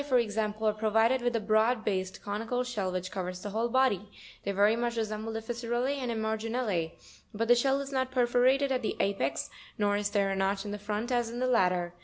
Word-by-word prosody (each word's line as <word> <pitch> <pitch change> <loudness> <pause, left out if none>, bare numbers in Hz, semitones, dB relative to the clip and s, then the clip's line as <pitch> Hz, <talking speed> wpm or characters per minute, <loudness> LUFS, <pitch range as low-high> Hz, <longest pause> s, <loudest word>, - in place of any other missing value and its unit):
78), 290 - -12
for 255 - +5
example, 215 0 -1
are 215 - +3
provided 225 +4 +2
with 240 0 0
a - - +2
broad 220 +2 +2
based, 190 -2 -2
eonical 225 +5 -2
shell, 210 -7 -2
which 185 0 -3
covers 180 -2 -4
the 205 - -4
whole 225 +3 0
body; 230 -6 +2 0.3
they 200 - -1
very 205 +3 +4
much 235 0 -1
resemble 215 0 -2
the 225 0 -4
Fissurel 240 +1 -2
lz 275 +2 0
and 260 -3 -3
Emarginule, 220 -5 -1 0.4
but 230 +2 0
the 240 - +7
shell 270 +3 +2
is 280 0 -5
not 260 -1 0
perforated 255 +2 +3
at 255 -1 +1
the 220 - -2
apex, 140 -9 -1 0.3
nor 205 -1 +2
is 205 0 0
there 200 -1 +1
a - - 0
notch 195 +1 0
in 205 0 -3
front 210 +4 -3
as 240 -2 +1
in 235 - -6
the 255 - 0
latter. 180 -8 +2
220 Hz, 225 wpm, -30 LUFS, 205-245 Hz, 0.4 s, the